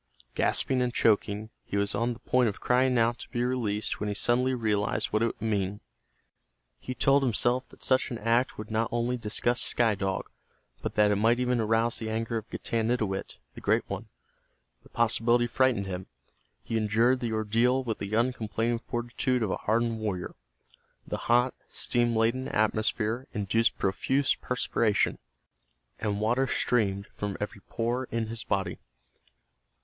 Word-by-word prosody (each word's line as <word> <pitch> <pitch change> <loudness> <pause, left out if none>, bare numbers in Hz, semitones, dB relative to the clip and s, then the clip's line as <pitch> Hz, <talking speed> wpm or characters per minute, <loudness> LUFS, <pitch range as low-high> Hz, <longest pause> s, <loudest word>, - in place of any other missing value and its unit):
Gasping 130 -1 +2
and 125 -1 +1
choking, 105 -1 +1
he 100 - -3
was 100 +1 +1
on 120 +1 0
the 115 - -13
point 125 -2 +2
of 100 - -7
crying 125 0 +2
out 115 +1 +2
to - - -10
be 120 -1 -1
released 115 -4 -1
when 105 - -2
he 105 - -2
suddenly 125 +4 +1
realized 105 -4 0
what 110 - +2
it 115 - +3
would - - -6
mean. 100 -2 -1 1.0
He 130 - -6
told 135 +2 +4
himself 125 0 +1
that - - -15
such 130 0 +2
an 120 - -4
act 115 +4 +1
would 105 0 -7
not 110 +1 0
only 120 +1 0
disgust 120 +1 0
Sky 115 -3 +2
Dog, 95 -1 -3 0.5
but - - -4
that 105 -1 +4
it 105 - +2
might 115 +4 +3
even 125 -1 +1
arouse 115 +1 +2
the 110 - -4
anger 115 +1 -2
of 110 0 -7
Getanittowit, 110 -4 -2 0.2
the - - -10
Great - - +1
One. - - -5 0.7
The - - -20
possibility 120 +1 +3
frightened 120 -3 +1
him. 95 -1 -5 0.6
He 115 - -2
endured 115 +4 +2
the 115 -2 -2
ordeal 115 +4 +2
with 115 -3 -3
the 100 +2 -3
uncomplaining 115 -1 0
fortitude 120 +1 -1
of 100 - -1
a - - -1
hardened 115 +1 0
warrior. 100 -5 -3 0.7
The - - -3
hot, 125 +2 +4 0.2
steam 120 -1 0
laden 115 +4 +1
atmosphere 110 +3 0
induced 105 +2 +1
profuse 135 +8 +1
perspiration, 115 -4 0 0.8
and 105 -2 -1
water 120 +5 +1
streamed 100 -7 +1
from 100 -2 -4
every 105 -1 -5
pore 120 +3 -1
in 115 -2 -3
his 115 -1 -3
body. 95 -1 -2
115 Hz, 165 wpm, -28 LUFS, 105-120 Hz, 1.0 s, told